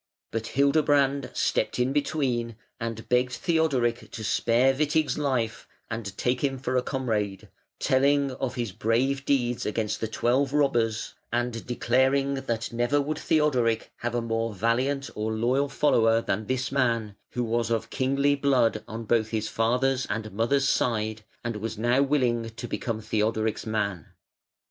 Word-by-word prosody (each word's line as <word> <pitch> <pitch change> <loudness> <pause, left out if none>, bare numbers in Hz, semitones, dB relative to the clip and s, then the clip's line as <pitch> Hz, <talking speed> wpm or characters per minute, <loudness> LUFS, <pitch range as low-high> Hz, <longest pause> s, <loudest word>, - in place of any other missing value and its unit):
But 115 0 -3
Hildebrand 140 -1 +3
stepped - - 0
in 125 +2 +1
between 130 -6 -1 0.2
and 115 -1 -5
begged 125 +1 +2
Theodoric 135 -8 0
to 110 - -7
spare 120 +4 +3
Witig's 150 +2 +1
life 125 -6 -1 0.2
and 110 -4 -5
take 125 +1 0
him 135 -1 0
for 130 0 -3
a 125 - +3
comrade, 110 -8 -2 0.3
telling 140 +1 +2
of 130 -1 -4
his 120 -5 -2
brave 130 +7 0
deeds 125 -4 +1
against 105 0 -2
the 110 - 0
twelve 130 +5 +1
robbers, 120 -7 +1 0.2
and 120 -1 -1
declaring 130 +3 +2
that 120 -4 -3
never 120 +5 +2
would 150 +2 -2
Theodoric 130 -8 +1
have 120 0 -3
a 120 - 0
more 115 -1 -2
valiant 125 +5 0
or 110 +1 -2
loyal 125 +6 +1
follower 115 -5 +3
than 105 -1 -2
this 130 +1 -1
man, 115 -6 0 0.2
who 125 - -1
was 115 0 0
of 115 0 -1
kingly 140 +2 +2
blood 130 -6 +2
on 115 +1 -6
both 110 0 +2
his 110 -1 -2
father's 125 +3 +1
and 110 -1 -3
mother's 135 +7 +1
side, 110 -4 0 0.2
and 115 -2 -3
was 110 +1 -4
now 120 +4 +2
willing 125 -5 +1
to 115 - -7
become 115 -2 -3
Theodoric's 110 0 -1
man. 100 -6 -2
120 Hz, 155 wpm, -26 LUFS, 115-135 Hz, 0.3 s, Hildebrand